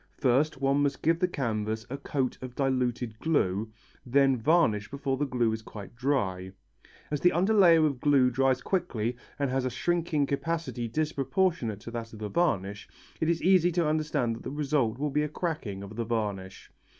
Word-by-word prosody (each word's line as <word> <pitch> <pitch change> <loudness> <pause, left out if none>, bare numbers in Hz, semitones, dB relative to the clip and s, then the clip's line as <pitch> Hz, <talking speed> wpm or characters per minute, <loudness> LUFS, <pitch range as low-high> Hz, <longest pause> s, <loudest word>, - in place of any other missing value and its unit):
First 135 +2 +2
one 140 +1 +2
must 145 -1 -1
give 165 +1 +3
the 180 - +2
canvas 110 -7 -2
a 135 - -5
coat 135 -2 -2
of 125 -1 -8
diluted 125 -4 -1
glue, 110 - 0 0.3
then 135 +1 +3
varnish 115 -5 +2
before 140 -1 -2
the 145 +2 -1
glue 120 -3 +1
is 110 0 -3
quite 105 0 -10
dry. 95 -8 -1 0.6
As 150 - -1
the 180 - +6
underlayer 180 -3 +5
of 140 -4 -1
glue 135 -4 +4
dries 130 0 +1
quickly 125 - -1 0.2
and 140 -2 -1
has 130 0 0
a 130 - 0
shrinking 165 +2 0
capacity 140 -4 -2
disproportionate 150 - -1
to 115 - -8
that 115 -1 -6
of - - -9
the 105 -1 -5
varnish, 105 - -1 0.3
it 160 - +1
is 170 -1 0
easy 180 -1 +4
to 170 -2 +1
understand 150 -7 0
that - - -12
the - - -4
result 140 -5 0
will 145 +1 -2
be 150 - +1
a 150 - -1
cracking 150 - -4
of 100 +2 -9
the 115 - -2
varnish. 105 -4 -4
135 Hz, 185 wpm, -28 LUFS, 115-155 Hz, 0.6 s, the